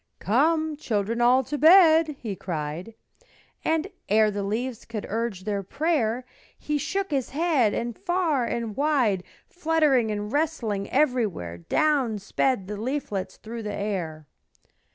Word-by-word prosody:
"Come, 310 - +1
children 230 -3 -1
all, 250 +2 +5
to 295 +3 -4
bed," 320 -2 +6
he 215 -5 -4
cried; 170 +4 -5 0.7
And 320 0 +1 0.2
ere 215 +1 +4
the 205 0 -3
leaves 225 +4 -3
could 220 -3 -6
urge 220 -3 -3
their 205 -1 -2
prayer 255 - -1 0.3
He 300 -1 -2
shook 385 +5 -2
his 270 -4 -1
head, 285 -8 +2
and 235 -1 -3
far 350 -8 0
and 230 -3 -3
wide, 260 -11 +2 0.2
Fluttering 310 -9 +2
and 210 0 -3
rustling 240 -10 -1
everywhere, 225 - 0
Down 265 - +1
sped 205 +2 0
the 205 +2 -5
leaflets 225 -4 -3
through 230 +1 -7
the 210 -1 -4
air. 175 -7 -3
235 Hz, 135 wpm, -25 LUFS, 205-300 Hz, 0.7 s, bed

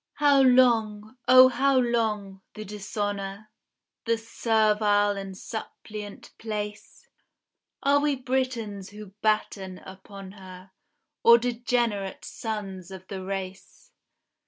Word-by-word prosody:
How 285 -2 +4
long, 230 -4 +3
O 255 +1 +9
how 265 +2 +2
long, 215 -6 0
the 215 - -7
dishonor, 205 0 -5 0.5
The 230 0 +1
servile 215 -2 +2
and 195 -1 -7
suppliant 210 -1 -8
place? 210 - -6 0.8
Are 280 +1 +4
we 290 -1 +1
Britons 250 -6 -3
who 210 -1 -11
batten 200 -3 -1
upon 190 0 -11
her, 190 -1 -13 0.5
Or 235 0 +8
degenerate 235 -4 -1
sons 195 -5 -6
of 190 -1 -10
the 190 -2 -5
race? 195 - -7
210 Hz, 105 wpm, -26 LUFS, 195-235 Hz, 0.8 s, O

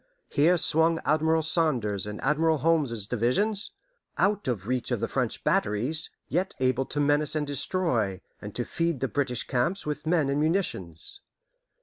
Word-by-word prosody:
Here 165 +5 +3
swung 160 0 +3
Admiral 160 +1 +2
Saunders's 125 - 0
and 105 0 -6
Admiral 155 +3 +2
Holmes's 145 -9 +1
divisions, 160 - 0 0.5
out 205 -3 +1
of 110 -7 -2
reach 125 -1 -1
of - - 0
the - - -1
French - - -2
batteries, 120 +10 +1 0.2
yet 185 +3 -1
able 130 0 +1
to 145 - -3
menace 145 +1 +2
and 150 -1 0
destroy, 135 - 0 0.2
and 105 0 -8
to 120 - -2
feed 165 -4 -1
the 135 - 0
British 125 0 -1
camps 130 +11 -1
with 150 +1 -4
men 160 -4 +2
and 140 +1 0
munitions. 150 - -1
145 Hz, 155 wpm, -27 LUFS, 120-165 Hz, 0.5 s, Here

